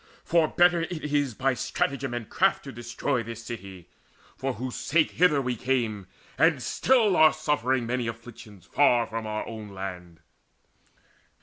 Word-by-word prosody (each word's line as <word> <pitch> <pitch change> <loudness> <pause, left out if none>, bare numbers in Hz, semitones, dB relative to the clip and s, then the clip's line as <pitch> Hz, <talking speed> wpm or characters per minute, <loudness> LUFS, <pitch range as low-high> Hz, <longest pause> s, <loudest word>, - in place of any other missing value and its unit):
For 165 -2 +3
better 175 +1 +3
it 155 -3 -4
is 145 -5 +1
by 135 +2 +1
stratagem 135 +1 -2
and 115 -3 -5
craft - - +1
Now - - -7
to - - -15
destroy 120 +2 -2
this 115 0 -8
city, 95 -6 -8 0.5
for 135 0 -3
whose 125 +3 -5
sake 160 0 +1
Hither 160 -4 +3
we 125 -1 -1
came, 115 -5 -1 0.3
and - - +4
still 230 -7 +2
are 155 -2 +7
suffering 130 -5 0
Many 120 0 -2
afflictions 115 -3 -10
far 120 -5 +3
from 115 -1 -5
our 110 0 -3
own 110 -2 -8
land. 90 -3 -7
125 Hz, 160 wpm, -26 LUFS, 110-145 Hz, 0.5 s, are